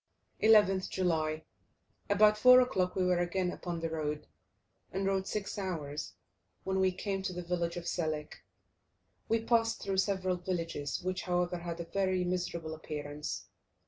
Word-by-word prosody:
11th 205 Hz, -4 st, +5 dB
July. 160 Hz, -4 st, 0 dB, 0.7 s
About 210 Hz, +1 st, +6 dB
4 250 Hz, +4 st, +8 dB
o'clock 185 Hz, -8 st, +1 dB
we 185 Hz, -, +1 dB
were 180 Hz, -1 st, +3 dB
again 180 Hz, +1 st, 0 dB
upon 175 Hz, -2 st, -4 dB
the 165 Hz, -, -1 dB
road, 150 Hz, -2 st, -2 dB, 0.7 s
and 195 Hz, +1 st, -2 dB
rode 195 Hz, -1 st, 0 dB
six 210 Hz, -1 st, -3 dB
hours, 155 Hz, -6 st, -4 dB, 0.5 s
when 190 Hz, 0 st, 0 dB
we 190 Hz, 0 st, +3 dB
came 195 Hz, +1 st, -3 dB
to 190 Hz, -, -2 dB
the 180 Hz, 0 st, -5 dB
village 170 Hz, 0 st, -1 dB
of 175 Hz, -, -5 dB
Selik. 155 Hz, -4 st, -3 dB, 0.9 s
We 225 Hz, 0 st, +2 dB
passed 230 Hz, -1 st, +2 dB
through 195 Hz, -1 st, -1 dB
several 190 Hz, -2 st, +1 dB
villages, 170 Hz, -5 st, -3 dB
which, 185 Hz, 0 st, -1 dB
however, 180 Hz, -1 st, 0 dB
had 170 Hz, -1 st, -5 dB
a 170 Hz, -, -4 dB
very 185 Hz, +1 st, 0 dB
miserable 175 Hz, -3 st, -2 dB
appearance. 150 Hz, -1 st, -5 dB
180 Hz, 150 wpm, -32 LUFS, 165-195 Hz, 0.9 s, 4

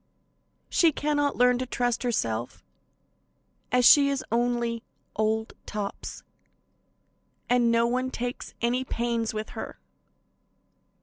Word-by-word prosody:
She 335 Hz, -2 st, +4 dB
cannot 290 Hz, -1 st, 0 dB
learn 250 Hz, 0 st, +4 dB
to 255 Hz, -, -3 dB
trust 245 Hz, -1 st, -1 dB
herself, 120 Hz, -, -2 dB, 1.1 s
and 250 Hz, -, +3 dB
as 250 Hz, -, +4 dB
she 280 Hz, +1 st, +8 dB
is 270 Hz, -2 st, -2 dB
only 235 Hz, 0 st, 0 dB, 0.3 s
"Old 220 Hz, +1 st, 0 dB
Tops," 205 Hz, -2 st, -5 dB, 1.3 s
no 235 Hz, -1 st, +4 dB
one 255 Hz, +2 st, 0 dB
takes 245 Hz, 0 st, -5 dB
any 245 Hz, +2 st, +1 dB
pains 235 Hz, -2 st, -1 dB
with 215 Hz, 0 st, -5 dB
her. -, -, -7 dB
240 Hz, 110 wpm, -27 LUFS, 230-255 Hz, 1.3 s, she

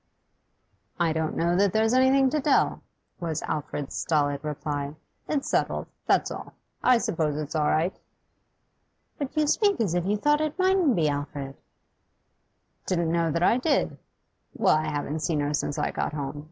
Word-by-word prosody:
'I 165 Hz, -2 st, +2 dB
don't 160 Hz, -1 st, -2 dB
know 170 Hz, +1 st, +2 dB
that 195 Hz, 0 st, +3 dB
there's 220 Hz, +1 st, +2 dB
anything 260 Hz, +1 st, +4 dB
to 305 Hz, -, 0 dB
tell,' 280 Hz, 0 st, +2 dB, 0.4 s
was 165 Hz, -3 st, -3 dB
Alfred's 145 Hz, -1 st, -4 dB
stolid 145 Hz, -2 st, 0 dB
reply. 145 Hz, -1 st, -3 dB, 0.3 s
'It's 285 Hz, -3 st, -1 dB
settled, -, -, 0 dB, 0.2 s
that's -, -, +2 dB
all. -, -, -7 dB, 0.3 s
I 250 Hz, -1 st, +5 dB
suppose 155 Hz, -9 st, -1 dB
it's 150 Hz, -1 st, -4 dB
all 150 Hz, -2 st, +1 dB
right.' 165 Hz, +5 st, +1 dB, 1.2 s
'But 285 Hz, +1 st, -4 dB
you 305 Hz, -, +4 dB
speak 405 Hz, +6 st, +2 dB
as 205 Hz, -7 st, +1 dB
if 175 Hz, +1 st, 0 dB
you 210 Hz, +1 st, +1 dB
thought 295 Hz, +7 st, +2 dB
it 310 Hz, +1 st, -2 dB
mightn't 370 Hz, -8 st, +3 dB
be, 160 Hz, -3 st, +2 dB
Alfred?' 145 Hz, -1 st, -4 dB, 1.3 s
'Didn't 170 Hz, -3 st, 0 dB
know 170 Hz, -1 st, +1 dB
that 170 Hz, +2 st, 0 dB
I 230 Hz, -, +4 dB
did. 285 Hz, +2 st, 0 dB, 0.6 s
Well, -, -, +4 dB
I 155 Hz, 0 st, 0 dB
haven't 150 Hz, +1 st, -3 dB
seen 155 Hz, -1 st, 0 dB
her 145 Hz, +1 st, -1 dB
since 145 Hz, 0 st, -1 dB
I 150 Hz, -, 0 dB
got -, -, -2 dB
home. 145 Hz, -1 st, -4 dB
170 Hz, 165 wpm, -26 LUFS, -, 1.3 s, I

